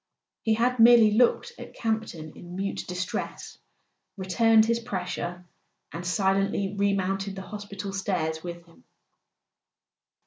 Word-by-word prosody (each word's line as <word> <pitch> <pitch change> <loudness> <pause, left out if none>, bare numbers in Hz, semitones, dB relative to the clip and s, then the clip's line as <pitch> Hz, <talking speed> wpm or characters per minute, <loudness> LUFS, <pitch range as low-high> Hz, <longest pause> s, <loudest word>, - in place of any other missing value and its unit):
He 220 -1 +2
had 245 +2 +1
merely 230 -2 +8
looked 245 - +3
at - - -10
Campton 220 -9 -3
in 175 0 -10
mute 195 +1 -3
distress, 180 +1 -5 0.6
returned 220 +4 +4
his 230 +1 +1
pressure, 180 -5 -4 0.5
and 170 - -6
silently 195 +1 +1
remounted 195 -1 0
the 190 - -6
hospital 200 -1 -7
stairs 170 -5 -2
with 170 -1 -7
him. 170 - -22
195 Hz, 115 wpm, -27 LUFS, 180-220 Hz, 0.6 s, merely